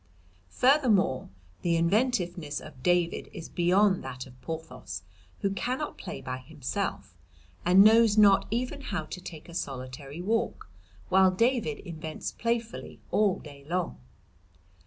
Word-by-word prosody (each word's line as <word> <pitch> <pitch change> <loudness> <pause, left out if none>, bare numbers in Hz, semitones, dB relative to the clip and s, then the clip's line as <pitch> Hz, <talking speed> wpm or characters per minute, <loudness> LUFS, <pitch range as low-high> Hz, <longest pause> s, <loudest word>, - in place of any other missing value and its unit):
"Furthermore, 235 - +3 0.3
the 170 -1 +2
inventiveness 175 - +1
of 125 - -12
David 175 +2 +1
is 165 -4 -7
beyond 185 +3 +3
that 130 -1 -6
of 125 -1 -16
Porthos, 160 - -6 0.4
who 195 - +1
cannot 255 +8 -3
play - - -6
by 130 0 -4
himself, 140 -1 -4 0.5
and 185 +3 +7
knows 220 0 +6
not 200 -2 +6
even 250 +5 -2
how 195 - -3
to 180 - -7
take 160 -3 -9
a 170 - -11
solitary 135 0 -5
walk, 220 +5 -1 0.4
while 190 0 +6
David 230 - +1
invents 160 -4 -6
playfully 230 -1 -3
all 205 -3 +3
day 140 -2 -12
long. 175 - -1
180 Hz, 130 wpm, -28 LUFS, 155-215 Hz, 0.5 s, and